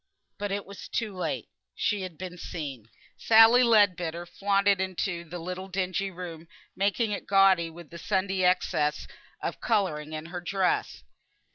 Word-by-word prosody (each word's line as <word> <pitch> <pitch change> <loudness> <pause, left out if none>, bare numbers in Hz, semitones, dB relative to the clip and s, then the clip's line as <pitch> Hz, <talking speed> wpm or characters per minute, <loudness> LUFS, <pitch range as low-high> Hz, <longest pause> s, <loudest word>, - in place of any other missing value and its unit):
But 205 -1 -3
it 200 0 -2
was 200 0 -10
too 215 -4 -2
late. 180 - -3 0.3
She 210 -2 0
had 185 -4 -7
been 180 -1 -7
seen. 140 -10 -7 0.3
Sally 225 +2 +7
Leadbitter 185 -8 +3
flaunted 200 +1 +1
into 185 -2 -2
the 170 +1 -8
little 180 +2 -6
dingy 190 +1 -1
room, 170 -3 -8 0.3
making 205 +3 +1
it 205 - -4
gaudy 195 -4 +4
with 170 -1 -13
the 170 - -9
Sunday 190 0 0
excess 180 -4 +1 0.4
of - - -4
colouring 155 -9 0
in 155 0 -5
her 180 - -4
dress. 185 +1 -1
185 Hz, 150 wpm, -27 LUFS, 170-200 Hz, 0.4 s, Sally